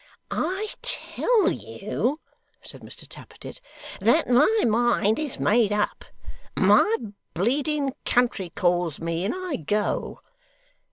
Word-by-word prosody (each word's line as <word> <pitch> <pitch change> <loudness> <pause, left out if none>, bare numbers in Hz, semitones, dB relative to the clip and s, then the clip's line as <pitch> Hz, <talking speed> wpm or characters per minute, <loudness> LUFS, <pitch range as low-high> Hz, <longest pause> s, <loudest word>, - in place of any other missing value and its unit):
'I 380 +6 -1
tell 475 -4 +1
you,' 285 +5 -3 0.4
said - - -11
Mr - - -10
Tappertit, - - -11 0.4
'that - - +3
my 305 - +4
mind 225 -1 +2
is 300 -4 -4
made 215 -1 +3
up. 210 0 -1 0.5
My 440 +1 +5 0.4
bleeding 275 - 0
country 240 -7 +1
calls 175 -2 0
me 165 +1 -2
and 215 - -1
I 370 -4 -3
go! 205 +7 -2
240 Hz, 110 wpm, -25 LUFS, 200-305 Hz, 0.5 s, My